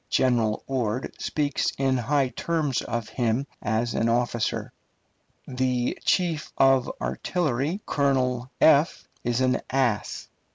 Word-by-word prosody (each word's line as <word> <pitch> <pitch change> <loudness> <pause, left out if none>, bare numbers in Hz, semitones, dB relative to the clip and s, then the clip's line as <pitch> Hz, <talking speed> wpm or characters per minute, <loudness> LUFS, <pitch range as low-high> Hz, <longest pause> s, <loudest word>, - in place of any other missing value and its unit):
General 120 -4 +2
Ord 125 -2 -2
speaks 145 -2 0
in 135 -1 +2
high 130 +2 +1
terms 150 -4 -1
of 115 -1 -3
him 120 +2 0 0.2
as 110 +2 0
an 115 - +1
officer. 120 -1 -1 0.7
The 125 -1 0
chief 170 -5 +1
of 135 -2 +4
artillery, 160 - -1
Colonel, 130 -3 0
is 140 -5 +2
an 130 0 +2
ass. 130 -5 0
130 Hz, 110 wpm, -25 LUFS, 120-140 Hz, 0.7 s, of